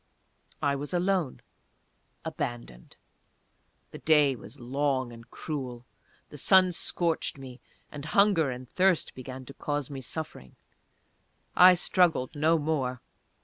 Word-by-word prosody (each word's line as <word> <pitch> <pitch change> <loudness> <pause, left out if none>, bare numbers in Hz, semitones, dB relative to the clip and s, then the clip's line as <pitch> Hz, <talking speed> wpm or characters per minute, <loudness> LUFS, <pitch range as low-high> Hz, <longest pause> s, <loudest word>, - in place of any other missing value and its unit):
I 140 -1 +2
was 145 +5 -4
alone; 180 -5 0 0.8
abandoned. 90 - -6 1.0
The - - -9
day 150 -4 +4
was 120 +4 -13
long 130 0 -1
and 115 +1 -14
cruel. 125 -6 -6 0.4
The 150 - -9
sun 185 +3 +5
scorched 170 -3 -1
me, 130 -2 -11 0.3
and 145 -1 -8
hunger 190 -4 +3
and 125 0 -6
thirst 185 +4 +1
began 130 0 -8
to 140 - -11
cause 145 -1 -3
me 135 -1 -6
suffering. 125 - -7 1.0
I 180 0 +8
struggled 170 -6 +1
no 160 +3 +3
more. 145 -5 -1
145 Hz, 120 wpm, -28 LUFS, 130-165 Hz, 1.0 s, I